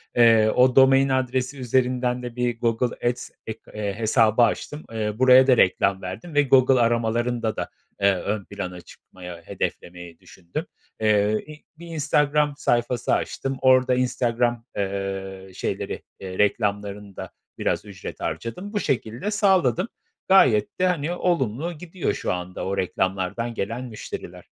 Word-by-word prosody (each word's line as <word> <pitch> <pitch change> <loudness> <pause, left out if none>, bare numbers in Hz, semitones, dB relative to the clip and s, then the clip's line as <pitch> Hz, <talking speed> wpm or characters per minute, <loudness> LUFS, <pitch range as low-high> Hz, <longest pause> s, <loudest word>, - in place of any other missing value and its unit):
Eee, 115 -2 +6
o 125 0 +4
domain 135 0 +6
adresi 130 +1 -1
üzerinden 125 0 0
de 120 -1 -6
bir 120 -1 -1
Google 120 +1 0
Ads 125 - -5 0.2
ek 110 0 -5
eee, 105 -2 -3
hesabı 110 +1 +3
açtım. 150 +6 0
Eee, 110 -1 -2
buraya 130 +1 +7
da 125 -3 +5
reklam 95 +1 +3
verdim 95 - -7
ve 145 0 +4
Google 130 -1 +4
aramalarında 115 0 0
da, - - -4 0.3
eee, 100 0 +5
ön 100 +2 -3
plana 90 -3 -6
çıkmaya 90 0 -12
hedeflemeyi 85 -1 -5
düşündüm. 85 -2 -7 0.4
Eee, 105 -1 +3
i 150 0 -12 0.2
bir 170 - -10
Instagram 150 -2 +1
sayfası 120 0 0
açtım, 135 0 -2
orada 130 -1 +4
Instagram, 120 -2 0
eee, 95 -1 -4
şeyleri, - - -4 0.2
eee, 95 -1 -7
reklamlarında 100 -1 -1 0.3
biraz - - -1
ücret 95 -2 -9
harcadım. 180 - -5
Bu 205 - 0
şekilde 125 - -2
sağladım. 190 - +2 0.4
Gayet 125 - +4
de, 185 - +3
hani, 170 -2 -1
olumlu 170 -3 -1
gidiyor 170 +2 -3
şu - - -2
anda 90 0 -5
o 100 +1 -2
reklamlardan 95 +5 -1
gelen 115 +5 -4
müşteriler. 110 -3 -8
120 Hz, 140 wpm, -24 LUFS, 100-130 Hz, 0.4 s, buraya